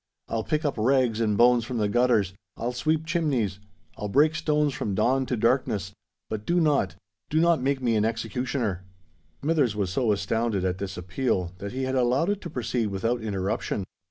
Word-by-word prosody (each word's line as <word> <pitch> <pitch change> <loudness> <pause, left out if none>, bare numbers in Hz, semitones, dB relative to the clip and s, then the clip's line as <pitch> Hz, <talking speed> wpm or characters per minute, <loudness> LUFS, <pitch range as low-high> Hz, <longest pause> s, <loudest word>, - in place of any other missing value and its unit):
I'll 115 -1 -2
pick 155 +3 -1
up 140 -6 -1
rags 120 -1 +2
and 105 -2 +1
bones 120 0 +5
from 120 +1 -4
the 105 -2 +1
gutters—I'll 105 -2 0
sweep 155 +5 0
chimnies—I'll 105 - -3
break 150 +9 +4
stones 150 -3 +1
from 100 -6 -2
dawn 130 +5 +2
to 125 - -1
darkness;—but 105 - -2
do 175 +9 +1
not—do 95 - -1
not 170 -2 +3
make 135 0 0
me 115 -2 +2
an 105 - +2
executioner!" 115 -3 -2 0.6
Smithers 145 -8 +2
was 100 -4 -1
so 115 +3 +1
astounded 105 -1 0
at 90 0 -1
this 95 -1 -5
appeal 90 0 -1
that 100 0 -5
he 130 +1 -2
had 130 0 -1
allowed 130 +8 +2
it 205 0 -3
to 175 - -6
proceed 120 -4 -1
without 115 +5 -1
interruption. 100 -1 -2
115 Hz, 170 wpm, -26 LUFS, 100-135 Hz, 0.6 s, bones